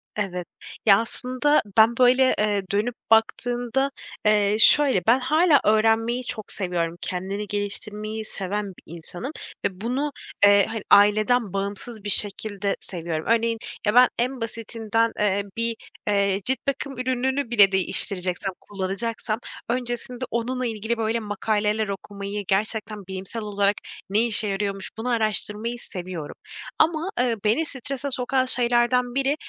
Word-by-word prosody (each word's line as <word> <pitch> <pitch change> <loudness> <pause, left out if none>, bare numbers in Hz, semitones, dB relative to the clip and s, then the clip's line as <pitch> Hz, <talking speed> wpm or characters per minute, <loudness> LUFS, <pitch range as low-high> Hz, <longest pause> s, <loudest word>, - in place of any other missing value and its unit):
Evet. 180 -4 -3 0.4
Ya, 200 -2 +7
aslında 255 +5 0 0.2
ben, 225 +1 +6
böyle, 255 +1 +5
eee, 210 -1 +1
dönüp 215 +4 0 0.2
baktığında, 245 +4 +2 0.3
eee, 210 -1 +3
şöyle, 270 -4 +6
ben 240 +3 +5
hâlâ 305 +3 +4
öğrenmeyi 225 +3 +2
çok 215 -3 -4
seviyorum. 175 -3 -2
Kendini 195 +3 -3
geliştirmeyi 210 +2 -3
seven 205 +1 -3
bir - - -18
insanım 175 - -7 0.3
ve 190 0 -3
bunu, 270 +6 -1 0.3
eee, 200 -1 +6
hani, 225 -2 -4
aileden 215 +1 +4
bağımsız 200 +3 -4
bir 205 - -3
şekilde 205 0 +1
seviyorum. 165 -3 -5
Örneğin, 230 0 +2 0.3
ya 210 - +3
ben 250 0 +8
en 250 +1 -1
basitinden, 225 0 -1
eee, 200 -1 +1
bir, 230 0 0 0.3
eee, 200 -1 +1
cilt 265 +1 +1
bakım 275 -1 -2
ürününü 260 +1 -1
bile 205 -4 +6
değiştireceksem, 190 0 -1
kullanacaksam, 205 +3 -3 0.3
öncesinde 245 +1 -3
onunla 250 +2 -1
ilgili, 225 0 -2
böyle, 225 +1 0
makaleler 210 0 -1
okumayı, 200 +1 -5
gerçekten 210 0 -1
bilimsel 190 +4 -5
olarak 205 -1 +1 0.3
ne 215 +4 +3
işe 220 -2 +2
yarıyormuş, 195 -1 -3
bunu 230 +3 -3
araştırmayı 220 0 -1
seviyorum. 180 -7 -7 0.4
Ama, 320 +2 +2
eee, 245 -2 +2
beni 230 +10 +2
strese 275 0 -4
sokan 255 +1 +1
şeylerden 245 0 +1
biri, 275 +1 +1
220 Hz, 130 wpm, -24 LUFS, 200-245 Hz, 0.4 s, ben